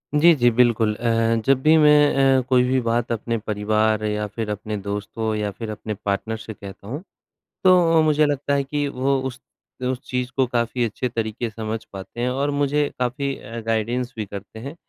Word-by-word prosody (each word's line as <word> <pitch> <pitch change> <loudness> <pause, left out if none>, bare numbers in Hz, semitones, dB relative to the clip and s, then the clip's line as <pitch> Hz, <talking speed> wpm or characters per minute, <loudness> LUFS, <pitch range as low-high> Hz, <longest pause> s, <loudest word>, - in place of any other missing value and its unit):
जी, 165 +3 +7
जी, 120 -3 +4
बिल्कुल 115 -2 +3
अ, 115 0 +1
जब 135 -1 +4
भी 155 +3 +5
मैं 145 -3 +5
अ, - - 0
कोई 125 -1 +5
भी 130 +1 +2
बात 115 0 0
अपने 115 0 -1
परिवार 110 +1 0
या 105 0 -1
फिर 105 +1 -5
अपने 105 +1 -4
दोस्तों 105 +3 -3
या 105 -1 -2
फिर 110 +2 -7
अपने 105 0 -5
पार्टनर 110 +3 -1
से 110 - -8
कहता 100 -1 -11
हूँ, 145 +9 -5 0.6
तो 185 -1 +7 0.2
अ, - - +6
मुझे 150 0 +4
लगता 145 -1 -1
है 140 0 +2
कि 145 +1 -2
वो 135 0 0
उस 130 -1 -8 0.5
उस 130 - -4
चीज़ 125 0 -2
को 130 - +4
काफ़ी 120 0 -1
अच्छे 120 +3 -3
तरीके 115 0 -3
से - - -18
समझ 110 0 -4
पाते 95 +5 -7
हैं 125 - +1
और 140 +3 -1
मुझे 145 +1 +1
काफ़ी 135 +2 -1
अ, 115 +2 -8
गाइडेंस 120 +3 -1
भी 110 - -2
करते 100 +2 -9
हैं। 140 +7 -7
120 Hz, 200 wpm, -22 LUFS, 110-135 Hz, 0.6 s, जी